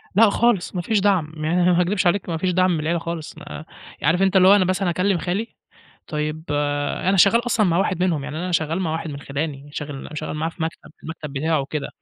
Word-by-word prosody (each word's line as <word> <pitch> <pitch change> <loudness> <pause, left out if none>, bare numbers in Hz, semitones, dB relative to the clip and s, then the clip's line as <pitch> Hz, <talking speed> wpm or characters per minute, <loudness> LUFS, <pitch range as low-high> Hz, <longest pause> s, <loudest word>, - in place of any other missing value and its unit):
لأ، 220 0 +6
خالص 220 -5 +1
ما 180 - -1
فيش 210 +3 +1
دعم، 190 -6 +1
ما 170 +3 +1
ه - - +5
ه - - +4
ما 180 - +3
اكدبش 180 0 +1
عليك 180 0 0
ما 165 - -1
فيش 180 +2 0
دعم 185 +1 +3
من 160 - 0
العيلة 165 +2 0
خالص، 165 -2 -6
ما 155 - -9 0.4
عارف 165 +5 +3
أنت 195 0 +2
اللي 185 - +6
هو 195 - +8
أنا 185 -3 +3
مثلًا 185 0 0
أكلم 185 +2 +1
خالي 190 +7 -2 0.6
طيب 155 0 -3
آآ، 145 +3 -1
أنا 195 - +3
شغال 230 +6 +5
أصلًا 215 -4 +2
مع 170 0 +2
واحد 180 -2 0
منهم، 160 -7 0
يعني 150 +1 -6
أنا 180 +2 -3
شغال 165 +2 0
مع 160 -4 -1
واحد 160 -1 -3
من 140 0 -7
خِلاني 145 0 -4
شاغل 145 -2 -6
م 155 - -9
شغال 150 - -4
معاه 160 +2 -1
في 165 - -7
مكتب، 160 -1 -5
المكتب 155 -3 -7
بتاعه 155 +2 0
وكده. 140 +1 -4
170 Hz, 250 wpm, -22 LUFS, 155-185 Hz, 0.6 s, هو